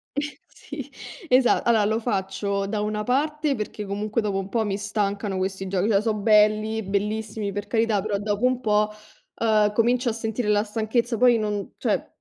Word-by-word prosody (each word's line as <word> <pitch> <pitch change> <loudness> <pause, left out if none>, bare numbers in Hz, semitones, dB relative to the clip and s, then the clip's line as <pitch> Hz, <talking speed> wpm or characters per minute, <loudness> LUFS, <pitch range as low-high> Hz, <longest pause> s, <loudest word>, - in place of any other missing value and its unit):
Sì, 285 -1 -7 0.4
esat 255 -2 +3
allora 220 -3 +4
lo 220 +2 +1
faccio 200 -2 -2
da 210 +1 -2
una 210 0 -2
parte 295 +3 0
perché 210 -1 -5
comunque 210 +3 -2
dopo 200 -2 -1
un 195 0 -5
po' 225 0 0
mi 200 -1 -1
stancano 205 -1 -2
questi 190 0 -3
giochi, 190 +3 0
cioè 200 -1 +3
so' 220 -1 0
belli, 215 +1 +3
bellissimi, 210 +1 -2
per 205 +1 -5
carità, 220 -2 +1
però 205 -1 -1
dopo 205 +3 -1
un 255 0 +2
po', 210 -2 +2 0.5
uhm, 215 -2 +3
comincio 240 +2 +2
a - - -1
sentire 225 0 -3
la 210 0 +3
stanchezza, 225 +2 -1
poi 245 -1 +5
non 210 -2 -3
cioè, - - -1
215 Hz, 175 wpm, -24 LUFS, 205-230 Hz, 0.5 s, poi